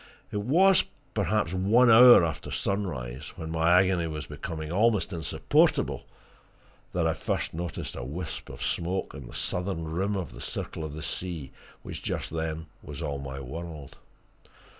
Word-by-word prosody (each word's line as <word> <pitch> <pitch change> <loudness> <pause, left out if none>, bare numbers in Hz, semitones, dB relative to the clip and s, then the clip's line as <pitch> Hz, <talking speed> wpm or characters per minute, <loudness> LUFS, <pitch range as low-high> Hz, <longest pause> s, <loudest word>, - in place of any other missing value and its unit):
It 105 - -1
was, 180 - +5 0.3
perhaps, 105 -5 0
one 110 +6 +5
hour 120 -5 +9
after 80 -3 -4
sunrise, 75 -9 -3
when 80 -2 -6
my 80 +1 +2
agony 95 -3 +2
was 75 -1 -5
becoming 80 +1 -6
almost 105 -1 +2
insupportable, 80 -2 +1 0.8
that 85 -2 0
I 80 - +2
first - - -2
noticed 85 -1 -4
a - - -5
wisp 80 +7 -5
of - - -7
smoke 90 +3 -2
on 70 -4 -9
the - - -11
southern 90 -2 -2
rim 95 +6 -1
of 90 -4 -3
the - - -10
circle - - -4
of 80 0 -5
sea 85 -8 -4 0.3
which - - -7
just - - -3
then 80 0 -3 0.2
was - - -7
all 70 -1 -2
my 70 0 -6
world. 75 +2 -8
85 Hz, 155 wpm, -28 LUFS, 80-95 Hz, 0.8 s, hour